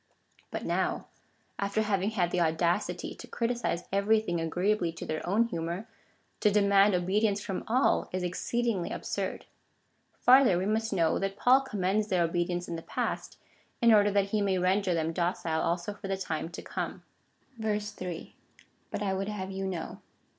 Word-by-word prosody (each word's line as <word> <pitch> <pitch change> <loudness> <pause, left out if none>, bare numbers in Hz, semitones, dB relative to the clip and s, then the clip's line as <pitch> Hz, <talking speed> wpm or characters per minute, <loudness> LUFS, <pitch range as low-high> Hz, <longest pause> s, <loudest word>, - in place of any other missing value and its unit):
But - - -5
now, - - 0 0.5
after 200 +2 0
having 200 -1 +1
had 180 -6 0
the 180 - +1
audacity 170 +4 0
to - - -11
criticise 235 -6 -1
every 200 +3 +3
thing 175 -6 -2
agreeably 180 +2 +1
to 165 - -7
their 155 0 -3
own 210 +5 +4
humour, 175 -1 -4 0.5
to 210 - +4
demand 200 -1 +4
obedience 200 +3 +1
from 195 -2 -4
all 250 +4 +2
is 185 0 -2
exceedingly 200 +2 -1
absurd. - - -4 0.7
Farther, 255 -7 +6
we 185 - -1
must 220 +2 0
know 170 -5 +2
that 195 0 -2
Paul 255 +5 +5
commends 210 -4 0
their 180 -4 +2
obedience 175 +1 -1
in 170 - -4
the - - -6
past, - - -3 0.4
in 235 -2 +6
order 205 -1 +6
that 200 -1 +1
he 210 0 +1
may 195 -2 +1
render 185 0 +2
them 165 0 -1
docile 170 -2 -1
also 175 +4 -1
for 205 -1 -8
the 195 0 -1
time 165 -3 -3
to - - -8
come. - - -4 0.6
3. 210 -5 -4 0.5
But 210 - -3
I 195 -2 0
would 195 +1 -2
have 195 -2 -4
you 195 0 -3
know. 180 -3 -5
195 Hz, 170 wpm, -29 LUFS, 175-210 Hz, 0.7 s, Farther